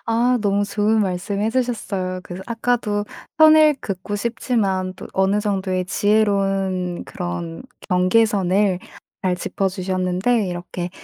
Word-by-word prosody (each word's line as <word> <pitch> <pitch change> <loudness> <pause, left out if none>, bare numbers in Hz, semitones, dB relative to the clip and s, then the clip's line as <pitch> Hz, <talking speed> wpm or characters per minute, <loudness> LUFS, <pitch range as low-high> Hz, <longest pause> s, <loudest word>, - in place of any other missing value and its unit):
아 240 +2 +2
너무 205 -1 +1
좋은 210 +2 +1
말씀 195 +1 -2
해 215 +2 +1
주셨어요. 210 -7 -2
그래서 185 0 -8
아까도 230 -3 0 0.3
선을 310 -1 +7
긋고 195 +1 -4
싶지만 205 -5 -1
또 - - -9
어느 190 +2 +2
정도의 190 -3 -1
지혜로운 195 -3 +1
그런 85 -2 -5 0.3
경계선을 190 0 +2 0.4
잘 180 -1 +1
짚어주셨는데 185 +4 0
이렇게 175 0 -5
195 Hz, 275 characters per minute, -21 LUFS, 185-220 Hz, 0.4 s, 선을